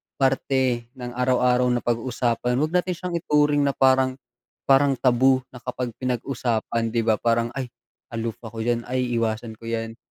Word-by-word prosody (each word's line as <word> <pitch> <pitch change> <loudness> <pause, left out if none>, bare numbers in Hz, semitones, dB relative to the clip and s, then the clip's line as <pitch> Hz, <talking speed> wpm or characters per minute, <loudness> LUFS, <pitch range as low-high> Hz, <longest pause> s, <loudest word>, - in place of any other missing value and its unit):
parte 130 -3 +1
ng 125 -1 -6
araw-araw 125 0 +3
na 125 -1 +1
pag-uusapan. 120 0 0
Wag 155 +1 0
natin 180 +1 +1
siyang 175 0 -3
ituring 150 -2 +2
na 140 - +1
parang, 130 -1 +3 0.6
parang 135 +1 +5
taboo 130 +1 +3
na 125 - -11
kapag 125 0 -4
pinag-usapan 120 -2 -1
'di 115 - +2
ba 110 -2 +3
parang, 115 +1 +1
ay 130 -2 -2 0.5
aloof 115 -1 -3
ako 115 0 -6
diyan, 120 0 0
ay 125 0 -1
iwasan 110 0 -2
ko 115 - -13
yan 115 0 -3
125 Hz, 160 wpm, -24 LUFS, 115-135 Hz, 0.6 s, parang